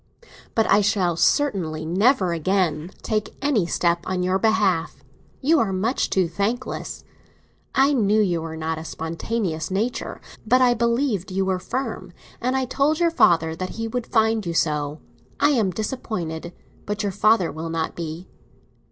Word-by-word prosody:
But 225 - +3
I 210 - +5
shall 190 -4 +1
certainly 170 - +1
never 190 - +2
again 170 -2 0
take 215 -1 -2
any 265 -11 +1
step 170 0 +1
on 185 -1 -1
your 185 +1 +1
behalf; 200 -6 +1 0.4
you 310 +3 +4
are 215 -6 +1
much 210 +7 0
too 185 -3 +2
thankless. 200 +9 -3 0.7
I 275 +2 +4
knew 215 -4 +3
you 175 -6 +1
were 160 0 -6
not 160 0 -2
a - - -7
spontaneous 160 +1 -3
nature, 220 +7 -2 0.2
but 245 +4 +4
I 250 -1 +5
believed 235 -4 0
you 190 +1 0
were 190 -1 0
firm, 255 +8 -4 0.3
and 255 +2 0
I 260 - 0
told 285 +5 +1
your 340 -1 +3
father 160 - +3
that 185 +2 -5
he 225 0 -2
would 240 +1 -3
find 220 -1 +2
you 170 -2 -4
so. 150 -1 0 0.4
I 290 - +4
am 225 -8 +2
disappointed—but 205 -1 -5
your 200 - 0
father 205 -2 +3
will 160 +1 -5
not 165 -1 -2
be!" 165 +2 -6
195 Hz, 160 wpm, -23 LUFS, 170-230 Hz, 0.7 s, I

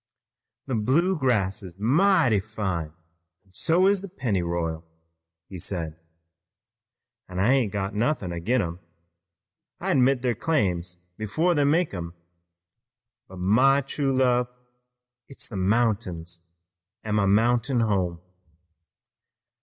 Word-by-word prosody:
"The 135 - -4
Bluegrass 125 - +1
is 90 -2 -11
mighty 145 - +3
fine, 95 -6 -3 0.6
an' 95 - -28
so 170 - +2
is 200 -1 +3
the 200 - -8
Pennyroyal," 85 - -2 0.6
he 95 - -8
said, 80 -3 -4 1.3
"an' 90 - -7
I 105 +8 +3
ain't 125 -7 +1
got 100 -1 -3
nothin' 105 - -1
ag'in 110 +10 0
em. 85 0 -5 1.0
I - - -1
admit 130 -1 +3
their 125 -2 +2
claims 90 - -1 0.2
before 155 - +1
they 145 -3 +2
make 160 - +2
'em, 85 -2 -6 1.1
but 95 - -12
my 125 +10 +4
true 135 0 -2
love, 125 -2 +2 0.8
it's 135 - -8
the 105 - -9
mountains 95 -5 -1 0.6
an' 110 - -3
my 105 -2 +2
mountain 120 +4 +2
home. 95 -6 0
110 Hz, 115 wpm, -25 LUFS, 95-135 Hz, 1.3 s, my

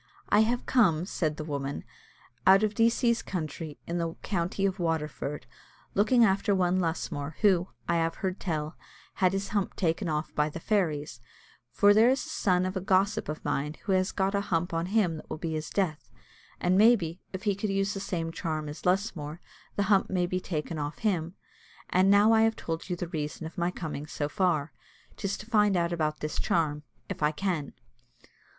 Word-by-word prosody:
"I 205 - +5
have 235 +3 +2
come," 180 -10 +3
said 155 -5 -2
the 155 - -4
woman, 140 -2 -4 0.6
"out 195 +2 +7
of 215 -1 +1
Decie's 235 +1 +2
country, 155 -3 -5
in 170 +1 -2
the 165 -1 -2
county 190 +1 -1
of 195 0 -1
Waterford, 150 -4 -2 0.5
looking 230 +4 +4
after 200 +1 +2
one 185 0 +2
Lusmore, 160 -3 -2
who, 190 -4 +4 0.2
I 170 - +2
have 165 0 0
heard 190 -1 -3
tell, 155 -3 -3 0.5
had 185 -1 +5
his 195 0 -2
hump 205 -2 -1
taken 170 +1 0
off 155 +1 -2
by 150 0 +1
the 160 - -7
fairies; 155 - -1 0.5
for 205 0 +5
there 220 +3 +6
is 265 +4 +1
a - - -9
son 185 -11 +1
of 185 +1 -3
a 190 - -1
gossip 195 -1 +1
of 155 - -5
mine 150 +2 -1
who 200 - -2
has 185 +1 +2
got 195 0 0
a 200 - +1
hump 175 -4 -1
on 165 +1 -1
him 190 -5 +1
that - - -12
will - - -4
be 160 +1 -3
his 155 0 -3
death; 180 -7 -1 0.5
and 185 +2 +3
maybe, 200 -7 +4
if 190 0 -6
he 205 -2 +2
could 200 +2 -3
use 195 +1 0
the 195 - -4
same 170 -4 -3
charm 155 -3 -3
as 150 +4 -6
Lusmore, 175 -5 -1 0.4
the 200 - +1
hump 195 -1 +3
may 180 -2 +1
be 185 +1 -1
taken 160 -2 -4
off 145 0 -4
him. 175 -4 0 0.6
And 185 +1 +4
now 205 +2 +6
I 220 - +5
have 225 0 +3
told 165 +2 -5
you 180 - 0
the 175 -1 -5
reason 155 -1 -4
of 160 - -8
my 175 0 0
coming 155 -4 -5
so 145 -1 -2
far: 160 -3 0 0.4
'tis 200 -1 -3
to - - -10
find 210 -4 +3
out 170 0 0
about 155 -2 -1
this 150 0 -3
charm, 150 -3 +1 0.3
if - - -6
I 150 0 +3
can." 155 -3 -2
180 Hz, 200 wpm, -28 LUFS, 155-200 Hz, 0.6 s, out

